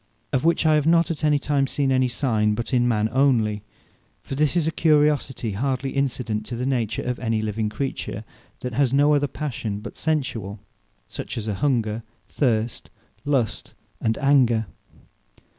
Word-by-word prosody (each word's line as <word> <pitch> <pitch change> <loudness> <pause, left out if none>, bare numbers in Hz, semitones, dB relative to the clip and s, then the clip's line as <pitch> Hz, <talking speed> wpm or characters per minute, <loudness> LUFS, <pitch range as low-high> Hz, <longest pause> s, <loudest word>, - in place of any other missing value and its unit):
Of 130 - +1
which 165 0 +2
I 155 - +5
have 150 0 +2
not 170 +1 +4
at 160 - -5
any 150 -1 +4
time 140 -1 0
seen 135 0 0
any 130 0 +3
signe, 110 -4 +1
but 120 +4 -4
in 120 -1 +3
man 110 -2 +2
onely; 115 -5 +2 0.6
for - - -7
this 145 +2 +1
is 165 - +2
a 160 - +1
curiosity 150 -7 +2
hardly 130 +5 -1
incident 125 -6 -1
to 120 - -4
the 125 +2 -3
nature 120 -5 -1
of 125 0 -3
any 115 -2 0
living 110 0 -1
creature 115 -3 -4 0.4
that 125 -1 -4
has 130 +1 +2
no 145 +2 +4
other 145 0 +2
Passion 120 -8 -4
but 105 - -9
sensuall, 120 - -2 0.5
such - - -6
as 110 -1 -4
are 105 - -1
hunger, 115 -2 0 0.3
thirst, 115 -4 -1 0.4
lust, 135 -7 -1 0.3
and 110 0 0
anger. 130 -6 +3
130 Hz, 170 wpm, -23 LUFS, 110-145 Hz, 0.6 s, I